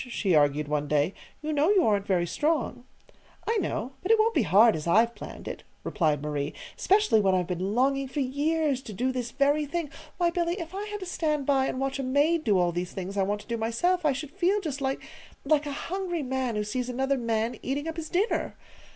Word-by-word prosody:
she 200 -6 0
argued 145 -1 +3
one 150 0 -1
day. 150 +5 +1 0.3
"You 310 0 -1
know 295 +4 +3
you 400 -3 +4
aren't 205 -2 +1
very 180 -3 +2
strong." 295 - -1 0.6
"I 455 - +1
know; 265 - -2
but 370 - 0
it 450 - +6
won't 445 +1 +3
be - - +3
hard, 220 +4 +5
as 155 +1 -5
I've 225 +7 +4
planned - - -9
it," - - -5 0.2
replied 155 -6 0
Marie, 145 -1 -3 0.2
"specially 395 - +3
when 190 -2 +3
I've 180 -1 +1
been 185 +4 -2
longing 275 +2 +2
for 265 +3 -4
years 285 +1 0
to 220 - -9
do 255 +7 0
this 250 -2 -3
very 285 +3 +1
thing. 325 -1 -3 0.3
Why, 345 -1 +2
Billy, 340 0 0
if 340 -2 -7
I 405 +2 -4
had 415 -1 -5
to - - -4
stand 305 -5 -1
by 270 -1 +2
and 255 - -3
watch 270 0 -2
a - - -1
maid 290 +5 +2
do 205 -3 +3
all 175 -1 +2
these 175 +1 -4
things 190 +1 -5
I 200 - +1
want 205 +2 -1
to - - -18
do 235 -1 -2
myself, 285 +12 0
I 300 - +4
should 275 +2 -5
feel 385 +4 +1
just 300 -7 -4
like 265 0 -2 0.4
like 295 0 +2
a - - -3 0.2
hungry 365 -4 -2
man 260 -3 -2
who 210 - 0
sees 245 +4 -3
another 265 +2 0
man 230 0 -1
eating 285 +4 -3
up 325 0 -4
his 315 -1 -5
dinner! 395 +6 0
265 Hz, 230 wpm, -27 LUFS, 210-320 Hz, 0.6 s, it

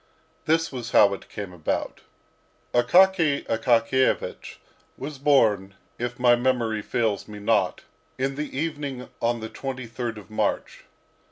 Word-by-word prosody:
This 165 +1 +2
was 125 -3 -6
how 100 -1 +6
it 100 - -9
came 100 -3 -7
about. 85 -3 -3 0.7
Akaky 160 +4 +4
Akakiyevich 115 +3 +1 0.4
was 140 0 -7
born, 110 -9 +3 0.2
if 120 0 -3
my 120 -1 +5
memory 120 -3 0
fails 110 -2 -1
me 105 -1 -9
not, 105 - +1 0.3
in 135 +1 -1
the 145 -1 -5
evening 145 -4 -4
on 120 0 0
the 110 - -5
23rd 120 -3 -5
of 105 0 -12
March. 110 - -2
120 Hz, 125 wpm, -25 LUFS, 110-135 Hz, 0.7 s, how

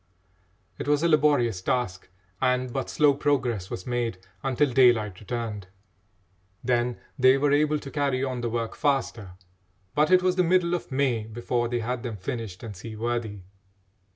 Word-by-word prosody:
It - - -4
was 145 +1 +2
a - - +4
laborious 145 - +3
task, 95 -4 -2 0.3
and 125 -1 +1
but 135 -1 -3
slow 145 -2 +4
progress 125 -9 0
was 90 - -6
made 120 -4 -1 0.2
until 135 0 +1
daylight 115 -7 +4
returned. 105 -2 -5 1.0
Then 120 -1 +1 0.2
they 130 +1 +6
were 145 +1 +2
able 150 +1 +3
to 140 -2 -8
carry 140 -3 0
on 130 -2 -2
the 120 - -1
work 115 -1 -3
faster; 120 -9 -1 0.6
but 150 +1 +3
it 185 0 +5
was 185 0 +2
the 180 - +4
middle 175 0 +2
of 175 -4 -3
May 130 -5 +1
before 120 +2 -2
they 120 0 -2
had 125 +2 -3
them 115 -3 -5
finished 100 -1 -5
and 110 -3 -7
seaworthy. 110 0 -4
125 Hz, 160 wpm, -26 LUFS, 115-140 Hz, 1.0 s, they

